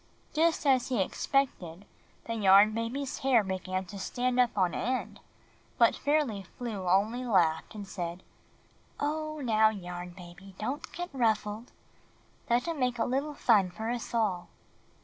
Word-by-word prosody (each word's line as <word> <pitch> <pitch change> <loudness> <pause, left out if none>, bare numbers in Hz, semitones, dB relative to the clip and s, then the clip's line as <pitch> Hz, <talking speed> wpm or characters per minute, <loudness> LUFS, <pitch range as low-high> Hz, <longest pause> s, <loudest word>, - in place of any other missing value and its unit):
Just 320 0 +2
as 260 -3 +3
he 250 -4 -1
expected, 190 -4 -1 0.4
the 230 - -3
Yarn 205 -1 +6
Baby's 240 +5 -3
hair 255 -5 +4
began 185 0 -3
to 200 +2 -9
stand 250 +5 -1
up 245 -3 +2
on 180 -3 +2
end; 255 +3 -2 0.6
but - - +5
Fairly 285 -9 0
Flew 195 -1 -5
only 215 +7 +2
laughed 180 -7 +1
and 205 -2 -7
said, 175 -2 -5 0.8
"Oh, 310 +1 -2
now, 220 -4 +4
Yarn 180 -3 -7
Baby, 185 +2 -12
don't 260 +7 -4
get 355 -2 -6
ruffled. 220 -2 0 0.8
Let 240 +4 +2
him 330 -3 -3
make 250 -1 0
a 225 - +1
little 280 +4 -2
fun 205 -9 +3
for 220 +5 -4
us 240 -1 -4
all." 210 -7 0
220 Hz, 150 wpm, -29 LUFS, 190-255 Hz, 0.8 s, Yarn